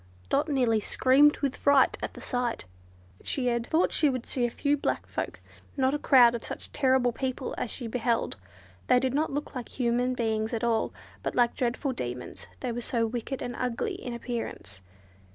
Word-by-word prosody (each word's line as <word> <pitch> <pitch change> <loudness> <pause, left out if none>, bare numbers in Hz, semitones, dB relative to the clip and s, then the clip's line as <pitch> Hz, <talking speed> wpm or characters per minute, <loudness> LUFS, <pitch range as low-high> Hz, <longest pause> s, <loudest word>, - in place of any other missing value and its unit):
Dot - - +1
nearly 245 -6 +2
screamed 270 +7 +4
with 275 -3 0
fright 280 -2 +4
at - - -4
the - - -9
sight. 245 - -2 0.6
She 265 - -2
had 235 -1 0
thought 325 +2 +2
she 300 - +4
would 255 -3 -3
see 245 -2 0
a - - -4
few 285 +4 +1
black 285 - -2
folk, - - -4 0.4
not 265 0 +2
a 295 - 0
crowd 245 -5 +6
of 235 - -4
such - - -6
terrible 260 -2 +3
people 260 +1 -3
as - - -2
she 245 - -4
beheld. 235 0 0 0.5
They 250 - +5
did 260 0 0
not 305 +3 +1
look 290 +2 -4
like 250 -3 -6
human 245 0 0
beings 220 -1 -1
at 225 - -3
all, 230 -2 +1 0.3
but - - -3
like 240 -1 +3
dreadful 255 +3 -1
demons, 125 - -6
they 250 - -2
were 240 +1 -3
so 230 -1 0
wicked 240 +3 -4
and 245 - -4
ugly 250 -2 -2
in 245 -1 -6
appearance. 230 - -5
245 Hz, 190 wpm, -28 LUFS, 235-265 Hz, 0.6 s, crowd